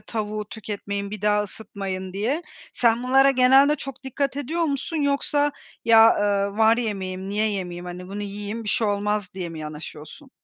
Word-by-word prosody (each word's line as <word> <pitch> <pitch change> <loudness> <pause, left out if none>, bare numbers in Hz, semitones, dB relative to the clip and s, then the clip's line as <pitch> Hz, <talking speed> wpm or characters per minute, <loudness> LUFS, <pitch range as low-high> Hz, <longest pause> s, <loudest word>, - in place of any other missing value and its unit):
tavuğu 215 -1 -4
tüketmeyin, 200 -2 -5
bir 210 -1 -7
daha 210 0 +3
ısıtmayın." 190 -3 -6
diye. 245 - -1 0.3
Sen 235 0 +3
bunlara 270 +2 +5
genelde 270 +3 +5
çok 275 -1 -8
dikkat 275 +1 -2
ediyor 315 +5 -2
musun 285 +2 -2
yoksa 290 0 +1 0.3
ya, 225 0 +7
ııı, 200 0 0
"Var 225 +1 +5
yemeğim, 190 -5 -3
niye 210 +2 +1
yemeyeyim? 180 -3 -4
Hani, 180 +1 -7
bunu 205 +2 -5
yiyeyim 205 +2 -5
bir 210 - -4
şey 220 - +1
olmaz." 205 -1 0
diye 180 -3 -4
mi 165 - -8
yanaşıyorsun? 155 - -9
210 Hz, 165 wpm, -24 LUFS, 200-260 Hz, 0.3 s, ya